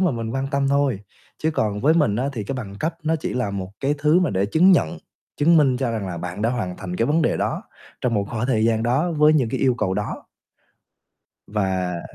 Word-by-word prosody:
mà 185 -2 +3
mình 115 -2 -4
quan 135 +2 -2
tâm 140 -1 +1
thôi, 140 -6 +1 0.4
chứ 160 - 0
còn 105 -8 -1
với 155 +4 +4
mình 145 -11 +2
á 130 +4 0
thì 110 -5 -4
cái 135 - -4
bằng 105 -7 -6
cấp 160 +1 -1
nó 160 +1 +1
chỉ 155 - -4
là 125 -5 -1
một 95 -2 -5
cái 140 +2 +1
thứ 150 +4 +3
mà 180 - +1
để 95 0 0
chứng 175 - +5
nhận, 85 - +1 0.4
chứng 165 +3 +4
minh 135 -5 +4
cho 125 -2 -1
rằng 110 -4 -3
là 90 -2 -5
bạn 90 +4 -5
đã 115 - +2
hoàn 105 -8 -3
thành 90 -2 -6
cái 115 - +1
vấn 155 +3 +2
đề - - +1
đó - - -2 0.4
trong 120 -2 0
một 100 -1 +1
khoảng 115 0 -2
thời 110 -4 +1
gian 110 -1 +2
đó 135 +9 +1
với 150 -1 +5
những 135 -7 +2
cái - - -3
yêu 130 -2 +3
cầu 100 -5 -1
đó. 105 +1 -4 1.2
Và 95 -4 -1
120 Hz, 245 wpm, -22 LUFS, 100-150 Hz, 1.2 s, chứng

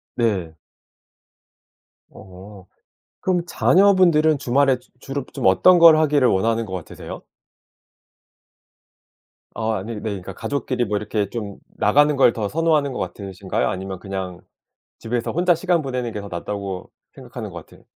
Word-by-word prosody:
네. 95 -9 -1 1.5
어 95 +1 -13 0.6
그럼 180 -2 +1
자녀분들은 175 -7 +4
주말에 135 0 +2
주 - - -27
주로 135 -1 -5 0.2
어떤 175 - +6
걸 165 -2 +8
하기를 150 -4 +3
원하는 115 +3 +1
것 95 - -9
같으세요? 90 -3 -8 2.3
어 110 0 -1
아니 110 +3 -4
네 - - -6
그러니까 100 -3 -5
가족끼리 125 -2 -2
뭐 105 0 -1
이렇게 105 -1 -2
좀 105 -4 -6 0.2
나가는 145 +8 +3
걸 135 - +6
더 105 -2 -1
선호하는 155 -3 +1
것 - - -5
같으신가요, 95 -1 -3
아니면 95 0 -5
그냥 95 -3 -6 0.6
집에서 115 +1 -2
혼자 175 +1 +3
시간 170 0 0
보내는 125 -4 -3
게 105 - -5
더 100 - -8
낫다고 95 +1 -5 0.2
생각하는 - - -8
것 - - -10
같으 - - -19
115 Hz, 295 characters per minute, -21 LUFS, 100-150 Hz, 2.3 s, 걸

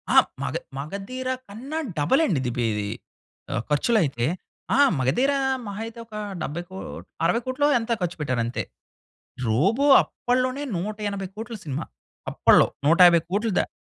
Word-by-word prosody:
ఆ! - - +7 0.2
మగ - - -3 0.2
మగధీర 200 - -5 0.2
కన్నా 260 +10 -6 0.2
డబుల్ 260 - +3
అండి 160 -10 +1
ఇది 125 -2 -2
బె 120 - +1
ఇది 105 -1 -2 0.8
ఖర్చులైతే. 150 - +2 0.5
ఆ! - - +3 0.2
'మగధీర' 260 - +2 0.3
మహా 205 +2 -5
అయితే 230 +1 -9
ఒక 220 - -20 0.3
70 170 +4 -3
కో 190 - -10 0.5
60,00,00,000 255 +7 +1
ఎంతో 230 +1 -1
ఖర్చుపెట్టారంతే. 130 -9 -1 0.8
'రోబో' 195 - +2
అప్పట్లోనే, 255 +3 -1
180,00,00,000 205 +3 -4
సినిమా. 145 -1 -4 0.5
అప్పట్లో - - +5 0.2
150,00,00,000 175 +5 +5
దా - - 0
200 Hz, 115 wpm, -24 LUFS, 150-240 Hz, 0.8 s, ఆ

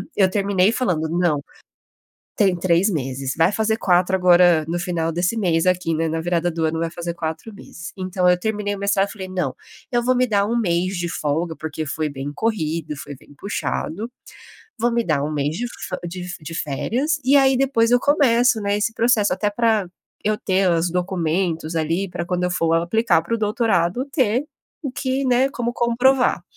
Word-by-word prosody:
Eu 190 -2 +4
terminei 200 0 +2
falando 175 -11 -1
não, 165 -4 +1 0.9
tem 195 -5 +3
3 175 +3 +2
meses, 135 -4 -3
vai 165 +2 +4
fazer 220 +1 +1
4 180 -1 +2
agora 175 -3 +5
no 175 +1 -1
final 175 -2 -1
desse 180 +7 0
mês 175 -5 +1
aqui, 180 -2 +1
né, 160 +1 0
na 160 +1 -2
virada 175 +1 0
do 165 -1 -2
ano 160 +1 0
vai 165 0 -1
fazer 170 0 -5
4 165 +6 -5
meses. 175 -3 -10
Então 185 -1 0
eu 180 - +4
terminei 205 +1 -2
o - - -7
mestrado 200 0 +1
e - - -8
falei: 190 -3 -7
"Não, 180 -8 -2 0.4
eu 240 -1 +1
vou 255 +1 +3
me 255 0 +2
dar 205 -4 +2
1 235 +2 -1
mês 185 -2 0
de 175 0 -2
folga, 160 +2 -2
porque 160 0 -5
foi 155 +2 -2
bem 140 +1 -5
corrido, 165 -8 -2
foi 145 -1 -8
bem 145 - -19
puxado. 200 +1 -3 0.7
Vou 240 +2 +1
me 235 0 +1
dar 155 -4 0
1 150 - -2
mês 150 +2 -1
de 245 - -2
fe - - -6
de 180 +1 -6
de 155 +2 -8
férias 250 - -1
e 275 +2 +5
aí 270 -1 +5
depois 250 -4 +2
eu 245 - +4
começo, 245 -5 +3
né, 200 0 0
esse 220 +2 0
processo 225 -4 +3
até 210 +1 -1
para 220 -3 +1 0.4
eu 215 0 +1
ter 190 -1 +1
os 170 0 +1
documentos 175 -2 -1
ali, 165 +5 -1
para 170 -1 -4
quando 180 0 -1
eu 180 - 0
for 165 -2 +1
aplicar 175 +4 +2
para 230 +8 -2
o - - -1
doutorado 215 0 +1
ter 255 -2 +1 0.4
o 280 - -3
que, 265 +1 -2
né, 255 +1 +3
como 240 -2 -3
comprovar." 245 -3 +2
185 Hz, 195 wpm, -21 LUFS, 165-225 Hz, 0.9 s, agora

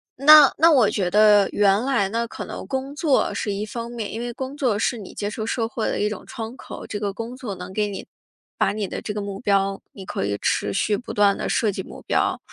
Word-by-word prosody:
那 295 +1 +8
那 330 +1 +6
我 250 -8 +5
觉 185 -4 -1
得 210 -1 +5
原 205 +1 +3
来 255 -7 +1
呢， 230 +2 -2
可 - - -7
能 - - -7
工 270 +1 -4
作 295 -3 +1
是 205 - -2
一 205 +2 -3
方 235 +2 -6
面， 230 -4 -5
因 225 - -4
为 240 0 -4
工 265 +3 -6
作 250 -8 0
是 240 +2 0
你 205 -4 -10
接 205 - -3
受 215 +1 -5
社 230 0 -1
会 225 -1 -3
的 - - -2
一 210 - +1
种 210 - -7
窗 230 -2 -7
口， - - -9
这 205 - -4
个 205 -1 -2
工 230 +4 -6
作 240 -6 -6
能 180 +1 -9
给 210 +1 0
你 200 - -6 0.5
把 - - +1
你 210 -2 -3
的 - - -6
这 - - -5
个 210 - -4
目 200 -1 -6
标， 195 -2 +1
你 195 - -11
可 - - -3
以 100 0 -1
持 100 - 0
续 210 - +1
不 245 - -8
断 205 -1 +4
地 - - -3
设 225 -5 +1
计 190 - -5
目 - - -11
标， - - +1
215 Hz, 275 characters per minute, -23 LUFS, 200-245 Hz, 0.5 s, 那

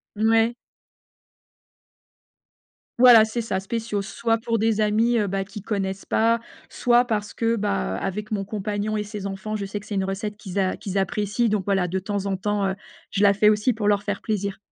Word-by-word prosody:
Mouais. 225 +2 +3 2.5
Voilà, 240 -3 +9
c'est 220 +2 -3
ça, 190 -4 -2
spéciaux, 215 +1 -3
soit 225 +2 -1
pour 230 0 -1
des 220 0 +1
amis, 225 +3 +2
heu, 210 - 0
bah, 195 0 -1
qui 205 +1 -9
connaissent 195 -2 -3
pas, 230 +1 +2 0.3
soit 245 0 +3
parce 210 -3 -3
que 230 0 +1
bah, 205 -2 -1
heu, - - -4
avec 210 +3 -4
mon 200 -2 -1
compagnon 210 +1 -3
et 210 - -1
ses 205 -1 -6
enfants, 195 +2 -5
je 200 -2 -3
sais 205 +1 -4
que 205 - -15
c'est 210 - -6
une 195 -1 0
recette 200 +2 -3
qu'ils 195 -2 -8
a 190 -1 +1
qu'ils 195 -1 -4
apprécient, 205 +4 0
donc 210 -3 0
voilà, 190 -3 +1
de 190 +2 -2
temps 200 +1 -3
en 195 -1 0
temps, 205 0 -1
heu, 190 - -1 0.4
je 195 - -1
la 200 -1 +5
fais 210 +1 +5
aussi 215 +3 +2
pour 210 -2 -2
leur 205 -1 +3
faire 205 -1 -3
plaisir. 200 -2 -2
210 Hz, 205 wpm, -24 LUFS, 195-220 Hz, 2.5 s, Voilà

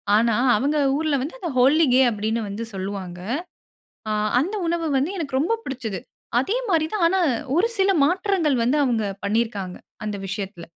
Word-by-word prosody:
ஆனா 230 0 +3 0.2
அவங்க 290 +6 0 0.2
ஊர்ல 310 -2 +1
வந்து 310 - -5
அத 340 - -3
'ஹோலி 295 +6 +5
கே' 260 +1 +6
அப்படீன்னு 220 +2 -1
வந்து 220 +3 -4
சொல்லுவாங்க. 190 -2 -5 0.9
ஆ - - 0 0.3
அந்த 390 +8 -2
உணவு 335 -1 0
வந்து 290 +8 0
எனக்கு 275 -4 -1
ரொம்ப 450 +10 +1
புடிச்சது. 225 -8 -4 0.4
அதே 425 - -1
மாரி 320 -3 +3
தான், 395 -5 0
ஆனா 380 +2 +1 0.4
ஒரு 435 +6 +4
சில 390 0 +4
மாற்றங்கள் 355 -5 +1
வந்து 275 +5 +2
அவங்க 225 -4 0 0.2
பண்ணியிருக்காங்க, 205 -4 -1 0.3
அந்த 205 -2 -3
விஷயத்தில. 190 -3 -5
265 Hz, 160 wpm, -23 LUFS, 210-330 Hz, 0.9 s, கே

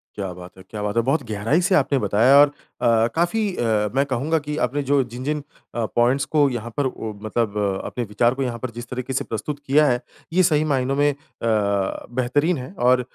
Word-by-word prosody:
क्या 95 -3 -4
बात 90 0 -11
है, 95 - -11
क्या 105 -1 -5
बात 105 +1 -2
है! 115 - +4
बहुत 135 +5 +1
गहराई 110 - +1
से 185 - +2
आपने 140 -6 +3
बताया 115 +5 +4
और 145 - +7
अ, 115 -5 0
काफ़ी 175 +6 +1 0.2
अ, 110 -3 +1
मैं 135 +1 +3
कहूँगा 140 +5 0
कि 150 0 -5
आपने 140 +4 -1
जो 140 -1 +4
जिन-जिन 130 +5 -4 0.3
अ, 120 - -1
पॉइंट्स 125 +3 +3
को 150 -2 +3
यहाँ 120 -2 -4
पर 145 - +1
ओ 110 -4 -4
मतलब 110 -1 -1
अ, 100 -2 -1
अपने 120 - -3
विचार 120 +3 +1
को 135 - -3
यहाँ 120 -2 -2
पर 130 +1 -5
जिस 120 +1 -9
तरीके 125 +1 -4
से 130 - -1
प्रस्तुत 115 +7 -4
किया 150 +3 +5
है। 125 -1 +1 0.3
ये 185 +2 +4
सही 155 -4 +3
मायनों 135 0 0
में 145 +1 +3
अ, - - -13 0.3
बेहतरीन 120 - 0
है 130 +7 -7
और 125 +1 +4
125 Hz, 220 wpm, -22 LUFS, 110-145 Hz, 0.3 s, और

